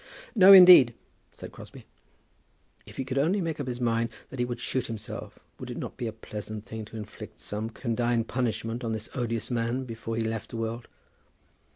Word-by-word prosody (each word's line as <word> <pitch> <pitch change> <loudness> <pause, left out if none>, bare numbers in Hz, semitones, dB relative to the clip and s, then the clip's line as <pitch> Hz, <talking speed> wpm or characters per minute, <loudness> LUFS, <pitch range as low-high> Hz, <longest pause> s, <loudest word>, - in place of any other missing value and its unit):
"No, 195 -4 +8
indeed," 180 -11 +10 0.4
said - - -10
Crosbie. - - -12 1.0
If - - -13
he 135 - -2
could 130 +1 -1
only 175 +8 +2
make 165 -4 -3
up 140 - -4
his 125 -1 -4
mind 115 -1 +1 0.2
that 130 - -8
he 125 - +2
would 120 0 -5
shoot 130 +1 -2
himself, 110 -2 -7 0.2
would - - -7
it - - -6
not - - -6
be 120 - -4
a - - -3
pleasant 110 -1 -8
thing 110 -2 -7
to 110 - -10
inflict 105 -1 -9
some 105 +2 -4
condign 120 0 -1
punishment 115 0 -2
on 115 -1 -2
this 110 0 -5
odious 115 -2 -3
man 120 +2 -1
before 115 -2 -6
he 115 - -1
left 110 -1 -4
the 115 - -6
world? 115 +1 -4
115 Hz, 195 wpm, -27 LUFS, 110-130 Hz, 1.0 s, indeed